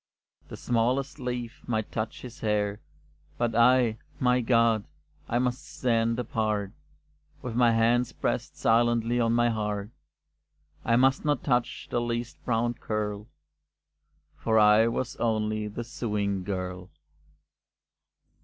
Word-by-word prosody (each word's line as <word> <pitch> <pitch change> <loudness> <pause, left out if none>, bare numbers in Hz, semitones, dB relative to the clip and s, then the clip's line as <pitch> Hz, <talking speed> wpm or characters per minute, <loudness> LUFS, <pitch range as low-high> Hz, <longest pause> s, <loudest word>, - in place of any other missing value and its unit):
The - - -9
smallest 125 +5 0
leaf 125 -2 -4
might 110 -3 -2
touch 110 0 -4
his 125 0 -9
hair; 105 -1 0 0.6
But 120 -1 0
I 120 -1 +4 0.2
my 125 0 +3
God! 115 -2 +3 0.4
I 120 - +1
must 125 +1 -1
stand 115 -2 0
apart, 110 -4 -1 0.7
With 125 - -4
my 120 -1 +5
hands 115 +2 +2
pressed - - -3
silently 120 +1 +2
on 115 -1 +2
my 120 0 +3
heart, 105 -1 -3 0.9
I 115 - +2
must 135 +2 +3
not 145 -3 0
touch 125 -3 0
the 120 - +1
least 120 +1 -4
brown 120 0 +1
curl; 105 -2 -4 1.1
For 110 -1 0
I 105 +1 +6
was 130 +3 -3
only 110 -2 0
the 105 +3 -5
sewing 105 -5 -2
girl. 90 -1 -4
115 Hz, 125 wpm, -27 LUFS, 110-120 Hz, 1.1 s, I